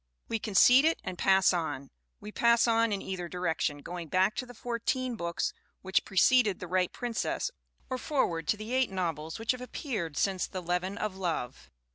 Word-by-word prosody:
We 225 - -1
concede 245 +6 +6
it 325 - +2
and 185 - -4
pass 190 +1 +4
on. 160 -5 -3 0.3
We 210 - -9
pass 235 +1 +4
on 230 -1 +3
in 200 -1 -2
either 180 -2 -4
di 180 - -8
rection, 160 -4 -1
going 175 -1 -6
back 185 +5 +2
to 255 - -3
the 245 - -12
fourteen 245 +2 -2
books 170 -4 -2 0.3
which 190 0 +1
pre 195 - -9
ceded 230 -2 +5
The - - -5
Right 185 0 +1
Princess 245 - -2 0.4
or 255 -1 -3
forward 170 - -1
to 210 - +2
the 215 +3 -6
eight 260 0 +2
nov 175 -5 -2
els 155 +1 -6
which 225 +1 0
have 255 -1 -5
appeared 220 - -4
since 190 -2 0
The 185 - -5
Leaven 180 +3 -1
of 210 -3 -3
Love. 170 -10 -3
195 Hz, 200 wpm, -30 LUFS, 175-235 Hz, 0.4 s, concede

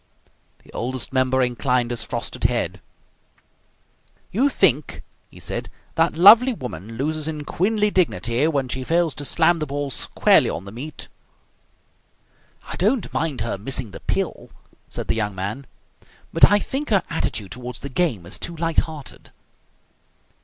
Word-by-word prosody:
The - - -19
Oldest 130 +2 -3
Member 130 0 +2
inclined 125 0 0
his 120 - -1
frosted - - -4
head. - - 0 1.5
"You 260 +8 +2
think," 155 - +1 0.3
he - - -15
said, - - -4 0.2
"that 165 0 +1
lovely 230 +8 +8
woman 115 - -7
loses 155 +5 -2
in 150 -2 -4
queenly 210 +5 +1
dignity 125 - +1
when 140 -5 0
she 130 +1 -3
fails 165 +1 +1
to 145 - -6
slam 170 +3 +3
the 155 - -3
ball 140 0 -3
squarely - - +3
on 90 - -5
the 100 - -9
meat?" 140 +8 -8 1.6
"I - - -8
don't 215 +2 +1
mind 155 -7 -1
her 110 -3 -3
missing 125 0 +1
the - - -9
pill," - - -3 0.4
said - - -5
the - - +2
young 105 -3 -2
man. 110 +8 -5 0.7
"But - - +6
I 205 - +6
think 270 +7 -3
her 200 -5 +3
attitude 105 - -2
toward 125 -1 -6
the 140 +4 -6
game 130 - 0
is 90 - -4
too 170 - -3
light 165 0 +1
hearted." 155 -4 -6
140 Hz, 155 wpm, -22 LUFS, 120-170 Hz, 1.6 s, lovely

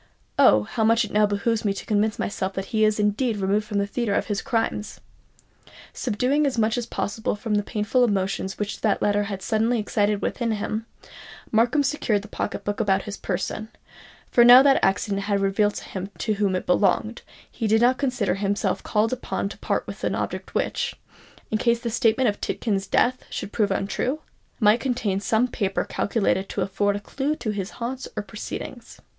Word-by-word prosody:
Oh, 105 0 +6
how 220 - -2
much 225 +1 +4
it 210 - -10
now 210 0 +4
behoves 215 +2 0
me 200 -2 +1
to 195 - -7
convince 210 0 +1
myself 195 -1 -2
that 190 0 -3
he 215 -1 +3
is 215 0 +3
indeed 210 +2 +1
removed 200 +2 0
from 210 -2 -2
the 200 - +2
theatre 205 0 -1
of - - 0
his 205 -2 -2
crimes!" 225 -4 -2 0.9
Subduing 260 +6 +1
as 260 - -2
much 220 0 +2
as 240 -2 -3
possible 215 +2 -2
the 210 -1 0
painful 210 +4 0
emotions 195 -3 -1
which 210 0 -4
that 215 -3 +1
letter 205 0 +2
had 195 -2 -5
suddenly 225 +2 +1
excited 210 -1 0
within 235 -2 -1
him, 215 +1 -3 0.6
Markham 235 +6 +3
secured 240 -8 0
the - - -10
pocket 200 -1 -4
book 205 +1 -3
about 195 -3 +2
his 205 -2 -6
person; 200 +4 -3 0.6
for 240 - +6
now 245 +2 +10
that 275 -1 +4
accident 195 +1 +1
had 200 -1 +1
revealed 200 +1 +1
to - - -6
him 190 0 -6
to 215 - 0
whom 200 -2 0
it 185 - -3
belonged, 205 +5 +1 0.3
he 225 - -2
did 220 +1 +3
not 250 +2 +4
consider 250 -7 0
himself 200 +1 -1
called 215 +3 +1
upon 245 -5 -3
to - - -10
part - - -1
with - - -9
an - - 0
object - - -4
which, - - -1 0.6
in 215 - +1
case 235 0 +2
the 235 -1 -3
statement 240 +2 +2
of 205 -2 -1
Tidkins' 195 -4 -2
death 255 +1 +2
should 195 - -5
prove 210 -3 +2
untrue, 245 +9 -1 0.4
might 215 0 +5
contain 230 -7 -1
some 220 +5 +2
paper 200 -5 -1
calculated 195 -2 0
to 200 - -3
afford 200 +2 0
a - - -2
clue 275 +8 -2
to 220 - -3
his 200 -2 -3
haunts 250 +2 -4
or - - -1
proceedings. - - -8
210 Hz, 195 wpm, -24 LUFS, 200-235 Hz, 0.9 s, now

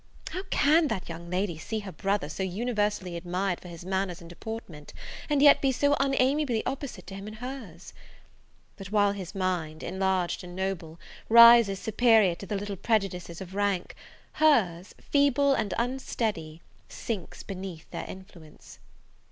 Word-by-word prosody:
How 370 - -3
can 310 +1 +4
that 215 -8 -3
young 170 +1 -8
lady 180 -2 -2
see 220 +5 -4
her 200 -2 -8
brother 195 -4 -1
so 155 +5 -6
universally 205 -2 -1
admired 180 +2 -2
for - - -11
his 170 0 -10
manners 190 -1 -2
and 170 - -12
deportment, 175 -4 -8 0.4
and 290 -1 +3
yet 285 - +7
be 270 - +3
so 285 +3 +2
unamiably 270 -2 +1
opposite 265 -8 -5
to 195 - -9
him 195 +1 -7
in 215 - -8
hers! 230 -8 -8 0.8
but 195 - -8
while 205 -1 +3
his 195 -1 -7
mind, 175 -5 -2
enlarged 190 -1 -1
and 175 0 -9
noble, 180 -4 -4 0.3
rises 235 -3 +8
superior 220 -2 +4
to 195 +3 -9
the 210 - -2
little 200 0 -5
prejudices 185 -5 -1
of 190 0 -8
rank, 200 -2 -1 0.4
hers, 200 - +2
feeble 280 -1 +3
and 210 -6 -1
unsteady, 220 -10 -3 0.3
sinks 210 -7 -6
beneath 185 -4 -7
their - - -5
influence. 180 -5 -13
195 Hz, 150 wpm, -28 LUFS, 180-235 Hz, 0.8 s, rises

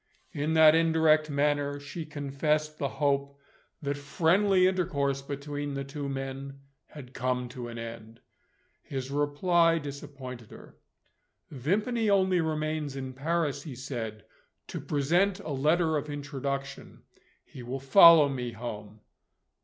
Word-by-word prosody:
In 150 +3 -1
that 160 -1 +8
indirect 160 -1 +3
manner, 145 0 0
she 145 +3 -7
confessed 150 +1 -1
the 140 - 0
hope 140 0 -1 0.5
that 140 0 -1
friendly 185 +6 +3
intercourse 150 -7 0
between 145 +1 -5
the 140 - -3
two 140 +1 -5
men 135 0 -6 0.3
had 135 -4 -12
come 125 -1 -1
to 125 -1 -7
an 120 0 -8
end. 115 0 -8 0.6
His 135 -1 -6
reply 165 +4 +2
disappointed 140 -5 -8
her. - - -14 0.8
"Vimpany 210 - 0
only 190 -3 +3
remains 155 -2 -2
in 130 -1 -5
Paris," 150 +1 -1
he 145 -4 -8
said, 120 -5 -6 0.4
"to - - -5
present 175 +7 +1
a - - -7
letter 155 +3 +2
of 150 +1 -4
introduction. 140 -1 -5 0.4
He 130 - -12
will 125 +3 -5
follow 160 +2 +8
me 125 -4 -4
home." 110 -2 -8
145 Hz, 130 wpm, -28 LUFS, 135-155 Hz, 0.8 s, that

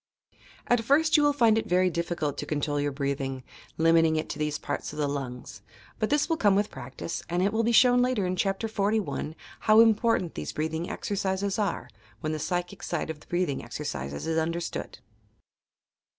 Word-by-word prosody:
At 245 -1 +2
first 310 +6 +3
you 300 - +6
will 290 0 +4
find 230 -6 +4
it 220 - -5
very 180 0 +3
difficult 170 -3 -2
to - - -3
control 145 -1 -1
your 145 0 0
breathing, 135 -1 -3 0.3
limiting 165 0 +4
it 155 - -2
to - - -5
these 150 -1 -1
parts - - -4
of - - -9
the 150 -1 +1
lungs: 135 -3 -5 0.4
but 215 - 0
this 295 +1 +2
will 325 -2 0
come 205 -6 +4
with 205 +1 +1
practice, 130 +5 -6
and 175 +2 +1
it 200 +2 +1
will 220 - +2
be 230 +1 +1
shown 245 +1 +6
later 250 -6 +1
in 180 0 -1
Chapter 195 +4 0
XLI 205 -6 -1 0.2
how 215 0 +5
important 225 -5 +3
these 75 - -5
breathing 160 +2 -2
exercises 195 0 -2
are, 205 -2 -1 0.3
when 155 - -2
the 155 - -3
psychic 175 +3 -3
side 165 -2 -2
of 155 - -9
the - - -19
breathing 175 -6 -1
exercises 70 +2 -5
is 160 0 +1
understood. 170 +1 -3
175 Hz, 190 wpm, -27 LUFS, 155-220 Hz, 0.4 s, you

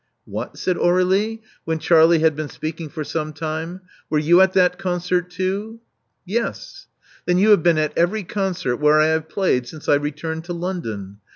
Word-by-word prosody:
What!" - - -6
said 185 - -1
Aurdlie, 190 +5 +1 0.2
when 160 0 -1
Charlie 165 +1 +5
had 160 -2 +3
been 155 -1 -4
speaking 160 0 -6
for 155 0 -5
some 155 0 -4
time: 160 +4 -5 0.3
were 155 - +1
you 170 +4 +5
at 190 0 +4
that 180 -1 +3
concert 180 -1 -1
too?" 195 +5 -3 0.5
Yes. 230 +6 -4 0.4
Then 180 0 +3
you 210 +4 +4
have 205 - +6
been 170 -1 +3
at 155 -1 0
every 195 +5 +1
concert 185 -9 -2
where 150 +1 +4
I 155 +1 +4
have 160 0 -1
played 140 -10 0
since 155 +4 -10
I - - +5
returned 150 +3 -2
to 175 - -4
London. 115 - -5
170 Hz, 180 wpm, -21 LUFS, 155-185 Hz, 0.5 s, have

